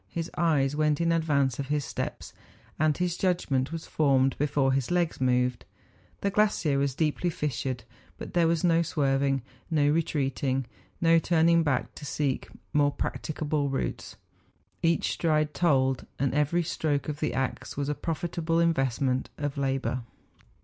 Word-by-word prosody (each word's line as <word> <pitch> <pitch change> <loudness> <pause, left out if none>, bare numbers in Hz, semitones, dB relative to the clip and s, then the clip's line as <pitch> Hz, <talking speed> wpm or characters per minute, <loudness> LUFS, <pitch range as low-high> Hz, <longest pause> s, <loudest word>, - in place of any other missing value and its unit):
His 165 0 -4
eyes 145 -5 +2
went 150 -1 +2
in 170 0 +2
advance 145 -6 +1
of 140 - -3
his 145 -2 0
steps; - - -5 0.5
and 155 -1 +2
his 180 -1 0
judgment 155 -8 0
was 165 -1 -5
formed 135 -3 +2
before 140 -2 +2
his 135 -2 0
legs 175 -5 0
moved. 125 -1 +1 0.6
The 200 - 0
glacier 195 -9 +2
was 140 -2 0
deeply 160 +3 0
fissured; 130 -5 -3 0.3
but - - -8
there 170 -2 +4
was 165 -1 +1
no 170 -1 +4
swerving, 135 -4 +1 0.3
no 150 -3 +3
re¬ 165 +1 +2
treating, 135 -3 -1 0.4
no 165 0 +5
turning 170 0 +3
back 145 -6 0
to 150 - -9
seek 140 -3 -1 0.3
more 145 -1 +4
practicable 150 -1 -2
routes; 135 - -3 0.7
each 165 0 +2
stride 155 -2 +1
told, 135 -6 +2
and 135 -1 0
every 150 +4 +2
stroke 155 -3 -1
of 150 -1 -4
the 155 - -1
axe 135 +1 -3
was 140 -1 -1
a 150 - 0
profitable 165 +1 -2
investment 135 -5 +1
of 145 -1 -3
labour. 135 -2 -1
150 Hz, 155 wpm, -28 LUFS, 135-165 Hz, 0.7 s, no